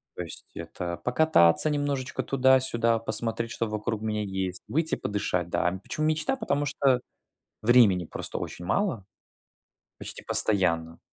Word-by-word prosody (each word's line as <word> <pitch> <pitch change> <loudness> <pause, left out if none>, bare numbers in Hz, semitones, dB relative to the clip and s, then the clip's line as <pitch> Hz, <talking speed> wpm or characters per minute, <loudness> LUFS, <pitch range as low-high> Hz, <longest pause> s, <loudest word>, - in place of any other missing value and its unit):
То 90 - -4
есть 80 - -9
это 85 -1 -5
покататься 125 - +4
немножечко 145 -3 -2
туда-сюда, 130 -4 +3
посмотреть, 115 0 -2
что 115 - -2
вокруг 105 0 -3
меня 105 -1 -2
есть, 95 -2 -4
выйти 160 +2 0
подышать, 90 -4 -2
да. 85 - +1
Почему 155 0 -2
мечта, 160 +13 +1
потому 145 - -1
что 135 -3 +2 0.6
времени 105 -7 +5
просто - - -4
очень 90 - -6
мало. 120 - -1 0.9
Почти - - -7
постоянно. 85 -5 +1
115 Hz, 130 wpm, -27 LUFS, 95-140 Hz, 0.9 s, времени